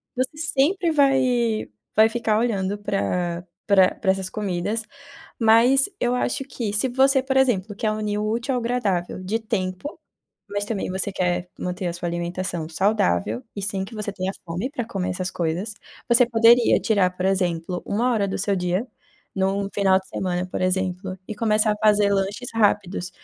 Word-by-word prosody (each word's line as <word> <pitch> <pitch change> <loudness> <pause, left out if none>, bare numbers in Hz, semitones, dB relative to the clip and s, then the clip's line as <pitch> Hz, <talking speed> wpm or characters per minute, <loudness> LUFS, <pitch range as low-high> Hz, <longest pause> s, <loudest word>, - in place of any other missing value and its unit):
você 260 +4 -2
sempre 325 +4 +2
vai 255 - +2 0.3
vai 220 +1 +6
ficar 225 -2 0
olhando 205 -4 -1
pra 180 -4 -2 0.2
pra 190 -3 +5
pra 190 - +1
essas 190 -1 -3
comidas, 205 +2 -2 0.6
mas 235 - +5
eu 245 0 +1
acho 250 +2 -1
que 235 -6 -4
se 210 +5 +2
você, 265 +2 +3
por 265 0 0
exemplo, 220 -6 +1
quer 215 +1 -1
unir 210 -1 -2
o 210 - -1
útil 240 +4 -1
ao 245 - 0
agradável 200 -7 -1
de 215 +5 -1
tempo, 215 - -4 0.5
mas 205 0 -2
também 205 -3 -3
você 190 +2 0
quer 180 -1 -1
manter 180 +1 -4
a 175 - -1
sua 175 0 -4
alimentação 175 -1 -3
saudável 125 - 0
e 200 - -4
sem 195 -1 -1
que 210 - -11
você 210 -2 -4
tenha 190 -1 -3
fome 175 +7 -3
pra 245 -6 -3
comer 190 -4 -3
essas 185 +1 -3
coisas, 175 +6 -2 0.3
você 240 0 +5
poderia 235 +1 +5
tirar, 185 -4 +1
por 185 - -3
exemplo, 180 -2 -1
uma 240 +5 +1
hora 205 -4 +1
do - - -3
seu 200 +1 +1
dia, 180 +4 -1 0.5
num 195 +1 0
final 190 -2 +3
de 190 - -14
semana, 180 -1 -2
por 185 - -5
exemplo, 185 0 -1
e 215 - -5
começar 215 -1 +2
a - - -4
fazer 210 -1 +4
lanches 200 +5 -2
rápidos. 200 -4 +1
205 Hz, 175 wpm, -23 LUFS, 185-230 Hz, 0.6 s, vai